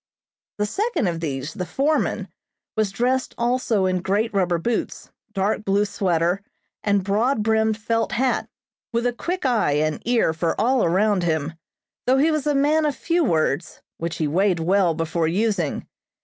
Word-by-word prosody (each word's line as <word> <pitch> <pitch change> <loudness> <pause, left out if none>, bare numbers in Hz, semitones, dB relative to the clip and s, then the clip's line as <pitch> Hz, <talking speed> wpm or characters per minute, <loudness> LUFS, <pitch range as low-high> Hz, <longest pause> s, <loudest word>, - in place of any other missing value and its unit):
The 210 - +1
second 425 - -1
of 170 -2 -1
these, 140 -2 -4
the 185 - -4
foreman, 280 - 0 0.5
was 215 -2 +1
dressed 250 +5 -1
also 235 -4 +1
in 185 -1 0
great 205 +5 0
rubber 180 -3 +1
boots, 225 +8 -3 0.2
dark 205 +1 0
blue 200 +1 +2
sweater, 180 -2 0 0.4
and 200 -2 +2
broad 215 +5 +1
brimmed 220 0 +2
felt 225 +1 -1
hat, 255 +2 0 0.4
with 235 0 0
a 245 - +1
quick 355 +7 -3
eye 230 - +2
and 155 +1 0
ear 235 -9 +2
for 165 +1 -1
all 250 +4 +3
around 195 +3 +2
him, 160 -2 -1 0.5
though 260 +1 +4
he 305 +4 +3
was 305 -1 -1
a 295 - +2
man 300 +3 +3
of 290 - -1
few 340 0 0
words, 160 - 0 0.2
which 165 0 -3
he 155 - 0
weighed 180 +3 +2
well 175 0 +2
before 165 0 -1
using. 185 -3 0
205 Hz, 165 wpm, -23 LUFS, 170-245 Hz, 0.5 s, though